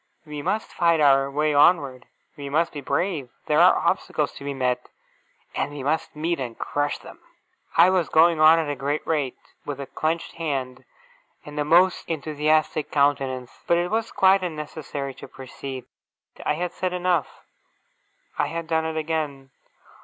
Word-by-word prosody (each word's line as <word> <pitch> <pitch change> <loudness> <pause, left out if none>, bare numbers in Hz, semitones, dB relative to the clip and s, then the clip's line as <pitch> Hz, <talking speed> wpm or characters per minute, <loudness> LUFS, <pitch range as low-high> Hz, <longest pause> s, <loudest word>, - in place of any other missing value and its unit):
We 150 -1 -6
must 215 +9 -2
fight 170 -2 +3
our 135 -2 +4
way 150 +2 0
onward. 145 -4 +3 0.3
We 140 -2 -7
must 165 +4 +1
be 145 - -6
brave. 140 -1 -1 0.2
There - - +2
are - - +6
obstacles - - 0
to - - -10
be 140 - -3
met, 130 -2 -1 0.6
and - - -1
we 145 -2 -7
must 155 +3 -1
meet, 165 +2 -1
and 120 -3 -5
crush 145 0 -1
them!' - - -13 0.6
I 185 - +7
was 185 -4 +1
going 165 0 +5
on 155 +1 +7
at 160 -2 0
a 145 - -2
great 145 +2 -2
rate, 145 -6 -1 0.3
with 145 -2 -5
a 140 - -4
clenched 160 +5 -3
hand, 130 -5 -3 0.6
and 150 0 -7
a - - +2
most 175 +4 +3
enthusiastic 155 0 0
countenance; 135 -3 +1 0.2
but 170 - +4
it 175 +2 -1
was 225 +1 -1
quite 190 0 +4
unnecessary 150 -4 -5
to - - -11
proceed. 130 -1 -8 0.6
I - - 0
had 175 +2 -2
said 185 0 -3
enough. 180 -3 -1 0.9
I - - +2
had 165 +2 -4
done 160 0 0
it 160 0 -3
again. 150 -4 -3
150 Hz, 170 wpm, -24 LUFS, 140-165 Hz, 0.9 s, I